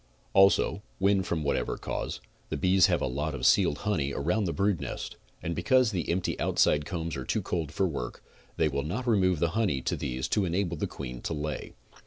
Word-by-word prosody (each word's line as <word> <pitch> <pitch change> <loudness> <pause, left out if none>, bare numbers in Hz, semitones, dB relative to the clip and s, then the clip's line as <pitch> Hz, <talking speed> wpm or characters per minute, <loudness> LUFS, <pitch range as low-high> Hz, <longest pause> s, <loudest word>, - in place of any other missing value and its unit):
Also, 95 +1 +4 0.2
when 100 0 +3
from 85 -4 -2
whatever 70 - -1
cause, - - -4 0.3
the - - -2
bees 95 0 +5
have - - +1
a - - +2
lot 75 +4 -2
of - - -3
sealed 75 - +4
honey 75 -10 0
around 90 +9 0
the 85 - 0
brood 100 -2 +1
nest, - - -5 0.3
and 85 - -2
because 125 +7 +3
the 90 -5 -2
empty 90 +2 -1
out - - -1
side 75 -1 +4
combs 80 +1 -3
are 65 - -4
too - - -1
cold 80 -5 -2
for 95 - +1
work, 70 -7 -5 0.3
they 80 - +3
will 70 -1 -1
not 100 - -3
remove 95 -7 +3
the 85 +2 +1
honey 100 -7 0
to - - -1
these 65 -1 -3
to 105 - +1
enable 90 -1 0
the - - -2
queen 60 -3 -7
to 80 - -3
lay. 75 0 -4
85 Hz, 215 wpm, -28 LUFS, 75-95 Hz, 0.3 s, bees